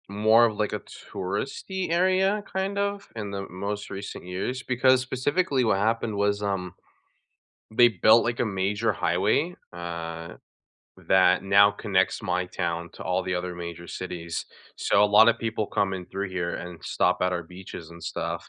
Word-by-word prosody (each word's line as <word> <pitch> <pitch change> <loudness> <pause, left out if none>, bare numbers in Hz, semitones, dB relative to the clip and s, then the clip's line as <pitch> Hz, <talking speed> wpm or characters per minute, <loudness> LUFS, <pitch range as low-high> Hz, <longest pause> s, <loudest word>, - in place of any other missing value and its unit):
More 110 +3 +5
of 110 -3 -1
like, 105 -1 -1
a - - -1
touristy 140 - -5
area, 190 +4 +2
kind 190 +1 -2
of, 200 0 -2
in 105 -3 -5
the 100 -1 -5
most 100 +2 -4
recent 100 -1 -7
years, 95 +8 -3
because 130 +1 +3
specifically 130 +2 0
what 110 -4 +2
happened 110 +1 0
was, 100 0 +1
um, 95 -3 -2 1.0
they 120 +1 +7
built 110 +2 +5
like, 120 0 -2
a - - +2
major 105 +2 0
highway, 105 - +1 0.2
uh, 85 -1 -6 0.7
that 90 -1 +5
now 100 +1 +6
connects 100 -1 0
my 90 -2 -1
town 85 -1 -3
to - - -9
all 90 +1 0
the 90 0 -2
other 90 0 -3
major 85 0 -7
cities, 85 -3 -5 0.3
so, 100 - +3
a - - +7
lot 105 +2 +7
of 115 0 +3
people 110 -2 -2
come 100 -1 0
in 90 -2 -5
through 100 +1 -4
here 90 -2 -2
and 90 -1 -8
stop 90 0 +1
at 90 0 +2
our 90 -1 -2
beaches 90 -1 -10
and 85 0 -12
stuff, 85 - -4
100 Hz, 170 wpm, -26 LUFS, 90-115 Hz, 1.0 s, they